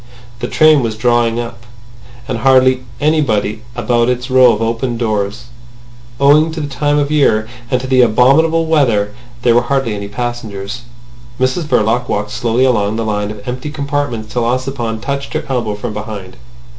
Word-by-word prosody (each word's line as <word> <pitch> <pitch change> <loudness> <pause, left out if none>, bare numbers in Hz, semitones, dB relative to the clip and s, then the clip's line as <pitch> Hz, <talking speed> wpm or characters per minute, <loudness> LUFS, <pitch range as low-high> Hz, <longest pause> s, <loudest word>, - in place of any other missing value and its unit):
The - - -3
train 155 -2 +4
was 110 -3 -3
drawn 120 0 +2
up, 120 0 -5 0.7
with 130 -4 -2
hardly 130 +1 +4 0.2
anybody 125 -9 +1
about 120 0 +1
its 125 +1 -2
row 130 -1 +6
of 105 - -1
open 115 +2 -1
doors. 110 -1 -2 0.8
Owing 150 +3 +4
to 160 - -5
the 150 - -3
time 145 +2 0
of 145 -1 +1
the - - -2
year 110 -7 +2 0.2
and 125 - +1
to 130 - -6
the 130 -1 +3
abominable 140 +8 +4
weather 115 -10 +1 0.3
there 120 - +4
were 120 - +4
hardly 135 -2 -1
any 100 -1 -5
passengers. 115 -1 -5 0.6
Mrs 130 +6 0
Verloc 120 -2 +1
walked 105 0 -2
slowly 120 +2 +1
along 105 -4 +1
the 115 0 -2
line 105 -1 -1
of 105 +1 -9
empty 130 +4 -4
compartments 140 -6 -3
till 120 - 0
Ossipon 120 -2 -2
touched 140 +3 -4
her - - -3
elbow 120 -6 -2
from 105 +1 -5
behind. 105 -3 -7
120 Hz, 170 wpm, -15 LUFS, 110-135 Hz, 0.8 s, row